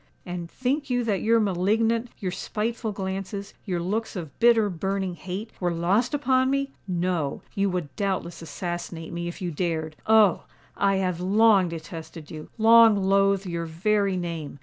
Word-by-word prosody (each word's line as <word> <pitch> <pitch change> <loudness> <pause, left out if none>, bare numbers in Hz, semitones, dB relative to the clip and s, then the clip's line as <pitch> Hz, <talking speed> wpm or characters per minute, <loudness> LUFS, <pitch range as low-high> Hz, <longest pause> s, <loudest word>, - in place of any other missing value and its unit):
And 175 -1 -5
think 270 - -2
you 245 -1 +1
that 210 -4 0
your 230 +1 +4
malignant—your 215 +2 0
spiteful 220 +4 -3
glances,—your 195 -1 -4
looks 210 +7 -2
of 160 -7 -7
bitter, 230 -2 +5
burning 190 +1 -2
hate,—were 185 +2 -4
lost 190 - +1
upon 260 -2 +2
me? 275 0 0 0.2
No—you 180 +1 -1
would 175 -6 -4
doubtless 190 -4 -2
assassinate 170 -1 -5
me, 170 0 -3
if 175 +3 -6
you 175 - -2
dared! 160 -1 -2
Oh! 215 -4 +5 0.3
I 195 0 +2
have 180 -2 -1
long 200 -1 +4
detested 160 -1 -8
you—long 225 +7 +5
loathed 195 0 +2
your 170 -2 -3
very 195 +3 +1
name! 165 -5 -5
190 Hz, 140 wpm, -25 LUFS, 175-220 Hz, 0.3 s, bitter